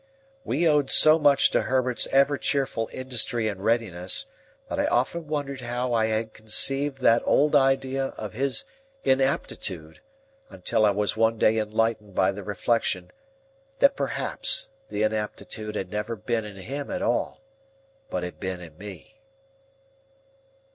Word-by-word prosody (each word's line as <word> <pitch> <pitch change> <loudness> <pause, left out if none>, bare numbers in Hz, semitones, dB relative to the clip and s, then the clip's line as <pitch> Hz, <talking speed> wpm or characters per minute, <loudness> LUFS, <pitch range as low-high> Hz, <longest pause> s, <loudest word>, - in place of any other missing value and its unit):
We 165 - +1
owed 150 -3 +3
so 155 +1 +7
much 145 -2 +4
to - - +2
Herbert's 130 -1 0
ever 140 +1 +3
cheerful 135 -5 -1
industry 120 -3 -1
and 100 -2 -4
readiness, 105 -6 +1 0.4
that - - -3
I - - +2
often 155 +7 0
wondered 140 -3 -3
how 120 +1 -2
I 110 -1 +2
had 110 0 -2
conceived 135 +6 +1
that 115 -1 +5
old 150 +1 +3
idea 135 -1 +2
of 105 -3 -6
his 135 0 0 0.4
inaptitude, 115 - -1 0.5
until 110 - +1
I - - +5
was 100 0 0
one 115 +1 +2
day 110 +1 +3
enlightened 110 -2 -1
by 95 - +3
the 100 +1 -7
reflection, 100 -2 -1 0.7
that 280 0 +4
perhaps - - -2 0.2
the - - -2
inaptitude 110 0 -3
had 95 -3 -4
never 105 +2 -3
been 115 +2 -2
in 105 -1 -9
him 135 +10 -6
at 275 0 -3
all, 300 -2 -1 0.7
but 90 - -3
had 90 - -7
been 95 -2 -4
in 85 -3 -12
me. 105 - -11
115 Hz, 145 wpm, -25 LUFS, 105-135 Hz, 0.7 s, so